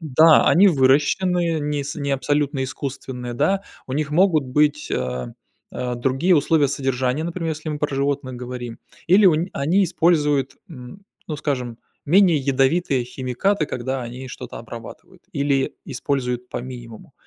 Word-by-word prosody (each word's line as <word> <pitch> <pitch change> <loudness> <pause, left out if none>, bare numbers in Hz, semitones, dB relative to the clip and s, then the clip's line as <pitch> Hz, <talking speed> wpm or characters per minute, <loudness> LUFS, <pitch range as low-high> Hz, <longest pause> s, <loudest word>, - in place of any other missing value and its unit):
Да, 155 +1 +5
они 190 +4 +6
выращены, 165 +4 +2
не 145 -1 -2
с 145 - -5
не 140 -1 -3
абсолютно 140 0 0
искусственные, 130 -2 -6
да, 195 +9 +1 0.2
у 130 - -6
них 150 +2 -1
могут 165 -2 +3
быть, 150 +3 +1
а, 65 -1 -2 0.4
другие 130 +8 0
условия 145 -1 +3
содержания, 130 0 -1
например, 170 -1 -3
если 155 0 -5
мы 150 - -4
про 145 -2 -2
животных 140 -1 -1
говорим, 125 -1 -7 0.3
или 195 +3 +6
у 170 - +6
ни 170 +4 -2
они 175 +8 +2
используют, 150 -6 +1
м, 145 +7 -11 0.2
ну 155 - -3
скажем, 125 -6 -3 0.3
менее 180 +1 +5
ядовитые 135 0 +1
химикаты, 130 +9 -1
когда 130 +1 -3
они 125 +2 -7
что-то - - -8
обрабатывают, - - -11
или 140 -1 0
используют 125 -2 -2
по - - -4
минимуму. 120 -3 -10
140 Hz, 145 wpm, -22 LUFS, 130-160 Hz, 0.4 s, они